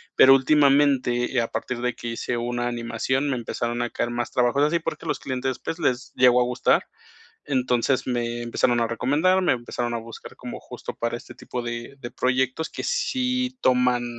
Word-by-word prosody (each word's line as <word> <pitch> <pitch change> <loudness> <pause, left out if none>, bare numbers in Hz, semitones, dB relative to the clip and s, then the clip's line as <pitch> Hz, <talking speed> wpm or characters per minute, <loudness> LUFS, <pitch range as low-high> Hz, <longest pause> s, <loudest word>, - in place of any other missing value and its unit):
Pero 135 0 +8
últimamente, 135 -3 +3
eh, 120 - +4
a 115 - -1
partir 120 +2 -4
de 125 0 -1
que 120 - -6
hice 120 +1 -3
una 120 +1 -2
animación, 120 +4 -1
me 130 - 0
empezaron 120 +1 -3
a 120 - -1
caer 120 - -2
más 120 0 -2
trabajos 125 +3 +2
así, 160 +3 +3
porque 155 -2 -5
los - - -1
clientes, 130 -1 -3
pues, 165 - -5
les 130 -4 -1
llegó 125 -1 +5
a - - +5
gustar. 125 0 +2 0.6
Entonces, 130 -1 +1
me 120 -1 -2
empezaron 120 0 +1
a 115 - +2
recomendar, 150 +11 +2
me - - +3
empezaron 120 -1 -3
a - - -1
buscar 115 0 -10
como - - -7
justo - - -8
para 115 0 -2
este - - -13
tipo 125 - -6
de 120 +3 -6
de 120 - -6
proyectos 130 +4 0
que - - -6
sí 255 - -1
toman, 125 -1 +3
125 Hz, 190 wpm, -24 LUFS, 120-140 Hz, 0.6 s, Pero